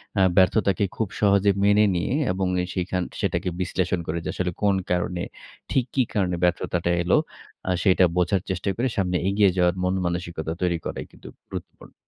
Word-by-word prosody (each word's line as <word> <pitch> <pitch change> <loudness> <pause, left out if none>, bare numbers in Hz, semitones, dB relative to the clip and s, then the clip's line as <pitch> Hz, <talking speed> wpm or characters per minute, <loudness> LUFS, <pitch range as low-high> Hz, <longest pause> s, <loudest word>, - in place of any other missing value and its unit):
অ্যা 95 - +4
ব্যর্থতাকে 100 0 +3
খুব 110 - 0
সহজে 100 -1 +4
মেনে 105 +1 +5
নিয়ে 85 +8 -1 0.2
এবং 95 0 -1
এ - - -1
সেখান 90 0 -1 0.2
সেটাকে - - 0
বিশ্লেষণ 90 0 0
করে 80 - -2
যে - - -2
আসলে 90 -1 -1
কোন 100 -1 +4 0.2
কারণে 90 0 0 0.5
ঠিক 130 -3 +2
কি 130 - +4
কারণে 90 -4 +1
ব্যর্থতাটা 85 0 +1
এলো 90 - +3 0.5
অ্যা 95 - +1
সেটা 95 -1 +5
বোঝার 90 +2 +2
চেষ্টা 95 +1 -2
করে 125 +3 +1
সামনে 90 -2 +1
এগিয়ে 100 0 +4
যাওয়ার 90 -1 +3
মন-মানসিকতা 85 -3 -2
তৈরি 90 -2 +1
করাই - - -4
কিন্তু - - -14 0.2
গুরুত্বপূর্ণ। - - -9
90 Hz, 170 wpm, -24 LUFS, 90-100 Hz, 0.5 s, মেনে